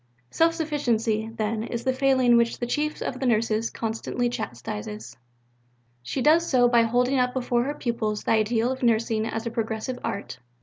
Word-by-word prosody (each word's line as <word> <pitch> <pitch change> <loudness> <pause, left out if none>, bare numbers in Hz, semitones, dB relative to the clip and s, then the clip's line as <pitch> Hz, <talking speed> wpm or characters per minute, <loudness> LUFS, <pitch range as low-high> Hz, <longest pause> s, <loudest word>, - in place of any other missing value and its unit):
Self 330 0 +3
sufficiency, 235 -9 0
then, 215 0 -1
is 235 0 -4
the 260 - +1
failing 260 -2 +3
which 235 0 +2
the 240 - -2
Chief 300 +5 -2
of 255 - -4
the 265 - 0
Nurses 225 -1 +1
constantly 230 +2 -2
chastises. 115 - -6 0.9
She 250 - -3
does 320 +3 +5
so 245 -2 +4
by 240 -1 +4
holding 245 +3 +2
up 250 0 +1
before 245 -1 0
her 290 +2 -3
pupils 230 -5 -2
the - - -1
ideal 225 +2 +2
of 260 - -5
nursing 225 -2 +1
as 225 +1 -4
a 235 - -3
progressive 225 +2 -3
art. 200 -10 -4
235 Hz, 175 wpm, -25 LUFS, 220-255 Hz, 0.9 s, does